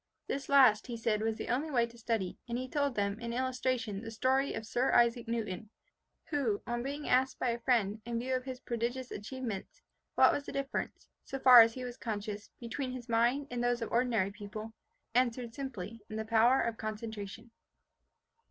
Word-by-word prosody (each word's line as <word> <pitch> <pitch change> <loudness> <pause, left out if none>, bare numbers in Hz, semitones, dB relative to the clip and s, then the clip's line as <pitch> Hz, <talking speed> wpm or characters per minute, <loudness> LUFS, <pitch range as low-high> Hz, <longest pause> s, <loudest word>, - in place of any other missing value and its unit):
This 275 0 -4
last, 255 -7 +6
he 240 -2 -4
said, 225 -2 0
was 220 0 0
the - - -5
only 275 +6 0
way 240 -5 +3
to 235 0 -14
study; 225 -5 -2
and 235 - -1
he 255 +1 -3
told 285 -1 0
them, 200 +1 -1
in 235 0 -4
illustration, 250 -4 -1
the 225 - -6
story 260 +4 +1
of 225 - -5
Sir 245 +4 +1
Isaac 235 -1 +4
Newton, 215 -3 -3 0.6
who, 250 -9 +1
on 240 0 -2
being 285 +3 -4
asked 260 +1 +3
by 250 - 0
a 235 0 -1
friend, 225 -4 +1
in 235 0 -3
view 255 +3 -2
of 255 0 0
his 260 -1 -6
prodigious 245 +2 -3
achievements, 220 -2 -6 0.3
what - - +6
was 285 - -3
the - - -4
difference, 275 0 -3 0.2
so 270 - -5
far 255 -2 +10
as 225 0 +4
he 255 - -5
was 245 0 -6
conscious, 210 -3 -4
between 255 +2 -4
his 250 -1 -8
mind 240 +5 +2
and 240 -1 -2
those 245 -1 +1
of 225 - -6
ordinary 230 -5 +2
people, 215 +2 -8 0.4
answered 240 -1 +1
simply 230 -5 -6
in 215 - -6
the 220 0 -3
power 230 +4 +4
of 230 -1 -1
concentration. 220 0 -6
235 Hz, 195 wpm, -32 LUFS, 220-255 Hz, 0.6 s, far